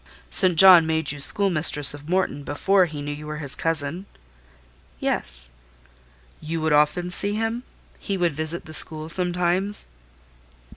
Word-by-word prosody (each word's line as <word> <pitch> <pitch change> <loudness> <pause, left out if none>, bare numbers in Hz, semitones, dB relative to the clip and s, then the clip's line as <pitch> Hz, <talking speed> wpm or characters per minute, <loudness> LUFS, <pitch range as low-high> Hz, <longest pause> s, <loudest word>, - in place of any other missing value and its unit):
"St. 180 - +3
John 175 -1 +7
made 160 -2 0
you 145 - -6
schoolmistress 155 -4 +2
of 145 +2 -12
Morton 180 -5 -2
before 185 +7 +1
he 150 -3 -8
knew 145 - -5
you 150 +1 -10
were 150 0 -6
his 140 -3 -2
cousin?" 165 +3 -3 0.9
"Yes." - - -3 0.9
"You 160 +1 -5
would 160 -1 0
often 150 +4 +1
see 200 +3 0
him? 225 +2 -3 0.4
He 200 -2 -4
would 175 -5 -1
visit 155 +3 +2
the 155 - -8
school 155 0 0
sometimes?" 180 +3 0
160 Hz, 145 wpm, -22 LUFS, 150-185 Hz, 0.9 s, John